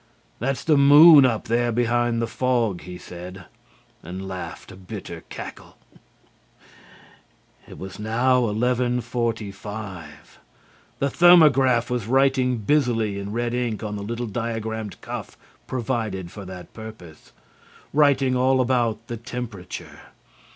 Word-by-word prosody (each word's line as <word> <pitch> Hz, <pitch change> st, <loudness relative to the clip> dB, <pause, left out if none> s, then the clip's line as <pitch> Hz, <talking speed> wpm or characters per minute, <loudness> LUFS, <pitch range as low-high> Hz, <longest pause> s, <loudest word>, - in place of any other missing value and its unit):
"That's 135 Hz, +3 st, -2 dB
the 155 Hz, -3 st, +3 dB
moon 145 Hz, 0 st, +8 dB
up 115 Hz, -3 st, -1 dB
there 120 Hz, +1 st, 0 dB
behind 120 Hz, 0 st, +1 dB
the -, -, -1 dB
fog," 120 Hz, -9 st, 0 dB
he 90 Hz, 0 st, -9 dB
said, 90 Hz, +1 st, -10 dB, 0.6 s
and 95 Hz, +2 st, -7 dB
laughed 95 Hz, -1 st, -7 dB
a -, -, -11 dB
bitter 95 Hz, -1 st, -8 dB
cackle. -, -, -9 dB, 1.9 s
It -, -, -12 dB
was 95 Hz, +1 st, -9 dB
now 120 Hz, +4 st, +2 dB
11:45. 110 Hz, -5 st, -2 dB, 0.9 s
The 140 Hz, -, 0 dB
thermograph 135 Hz, -9 st, +5 dB
was 120 Hz, -4 st, -2 dB
writing 130 Hz, -1 st, +2 dB
busily 115 Hz, -4 st, +1 dB
in 100 Hz, +1 st, -6 dB
red 120 Hz, +1 st, -2 dB
ink 120 Hz, -3 st, -2 dB
on 105 Hz, -1 st, -4 dB
the 100 Hz, -, -5 dB
little 115 Hz, +4 st, -4 dB
diagrammed 110 Hz, -1 st, -4 dB
cuff -, -, -7 dB, 0.3 s
provided 110 Hz, -8 st, -3 dB
for 100 Hz, -2 st, -9 dB
that 90 Hz, -1 st, -10 dB
purpose, 110 Hz, -8 st, -12 dB, 0.6 s
writing 140 Hz, -3 st, +3 dB
all 130 Hz, +1 st, +3 dB
about 120 Hz, -3 st, 0 dB
the 120 Hz, -, -6 dB
temperature. 115 Hz, -5 st, -7 dB
115 Hz, 120 wpm, -23 LUFS, 105-125 Hz, 1.9 s, moon